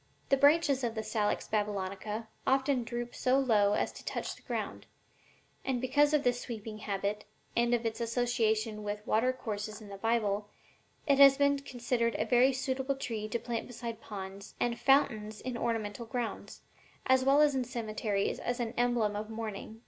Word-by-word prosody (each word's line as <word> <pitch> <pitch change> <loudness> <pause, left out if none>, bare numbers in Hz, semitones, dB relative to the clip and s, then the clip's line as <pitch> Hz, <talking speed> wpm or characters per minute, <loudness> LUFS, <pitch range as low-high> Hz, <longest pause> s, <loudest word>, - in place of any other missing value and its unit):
The 275 - +6
branches 285 -1 +4
of 235 -1 -1
the 220 - -2
Salix 215 -1 -1
Babylonica 210 +1 -2 0.2
often 265 -1 +2
droop 240 +1 -5
so 255 +1 +2
low 215 -7 +3
as - - 0
to - - -12
touch - - -3
the - - -18
ground, - - -4 0.8
and 260 -2 -1
because 290 +4 +3
of 300 -2 +2
this 245 0 +1
sweeping 220 -2 -6
habit, 205 0 -2 0.3
and 235 0 +2
of 235 -1 -3
its 225 +1 -2
association 225 -2 0
with 210 0 -4
watercourses 220 -3 -1
in 210 -2 -12
the 200 - -7
Bible, 210 -2 0 0.6
it 280 -2 +3
has 275 -1 +9
been 280 0 +3
considered 245 -3 -1
a - - 0
very 255 +2 +5
suitable 265 +1 -1
tree 225 -5 -4
to 225 - 0
plant 235 -1 -4
beside 230 -2 -6
ponds 195 0 -8
and 235 -1 0
fountains 220 -6 +2
in 255 -1 -4
ornamental 230 -1 -2
grounds, 240 0 -4 0.4
as 260 0 +4
well 275 +2 +5
as 300 -1 +5
in 260 -1 0
cemeteries 215 -4 -2
as 245 +1 -2
an 235 -1 -2
emblem 240 -4 +2
of 210 +1 -4
mourning." 220 -1 -6
235 Hz, 170 wpm, -31 LUFS, 215-255 Hz, 0.8 s, has